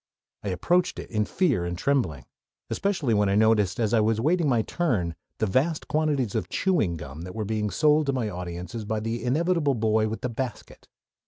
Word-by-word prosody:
I - - -4
approached 175 - +1
it - - -8
in 105 -2 +1
fear 140 - +1
and 85 0 -3
trembling, 105 - 0 0.5
especially 175 - 0
when 105 -1 +3
I 100 - +2
noticed 105 -3 +3
as 110 -1 +1
I 115 - +5
was 110 0 +2
awaiting 155 +6 +2
my 120 -4 +2
"turn" 110 - -1 0.2
the - - +1
vast 145 - 0
quantities 150 -8 0
of - - -2
chewing 145 - +1
gum 75 0 -8
that 90 +3 -8
were 110 -1 -2
being 105 0 -1
sold 150 - +3
to - - +3
my 125 -4 -1
audience 90 -2 -6
by 110 +1 -1
the 115 +2 -3
inevitable 150 +2 +1
boy 110 -1 +2
with 110 +1 -5
the 125 - -2
basket. 120 +1 -6
110 Hz, 195 wpm, -26 LUFS, 100-145 Hz, 0.5 s, I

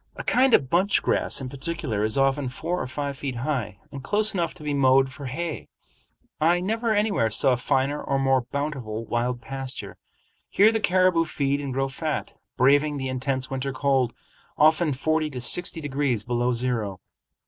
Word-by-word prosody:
A - - -6
kind 260 0 +4
of 135 - +1
bunch 190 +4 +2
grass - - +1
in 135 - -5
particular 135 -5 -3
is 110 +4 0
often 135 0 +1
four 170 +7 -3
or - - -3
five 140 +1 -4
feet 135 -3 -4
high, 120 -5 -3
and 140 -2 -8
close 215 +6 +1
enough 170 -3 -1
to 165 - -11
be 150 -1 -2
mowed 135 -1 +4
for 140 -1 -7
hay. 160 +5 -4 0.7
I 170 +3 +3
never 225 +5 -1
anywhere 205 - +1
saw 130 +4 +3
finer 135 +3 0
or 140 - -1
more 135 -1 +2
bountiful 130 -7 -3
wild 120 +2 -2
pasture. 135 -1 -6 0.5
Here 210 +3 +5
the 225 - 0
caribou 185 -4 +3
feed 140 -2 -1
and 140 -2 -4
grow 135 +1 0
fat, 150 +2 -4 0.2
braving 145 +3 +3
the 130 -1 -3
intense 130 0 -2
winter 135 +1 -3
cold, 135 -2 +1 0.4
often 155 +1 +4
forty 155 +3 0
to 130 -4 -6
sixty 165 +7 +1
degrees 135 -6 -1
below 120 +1 0
zero. 115 -6 -1
140 Hz, 175 wpm, -25 LUFS, 130-160 Hz, 0.7 s, Here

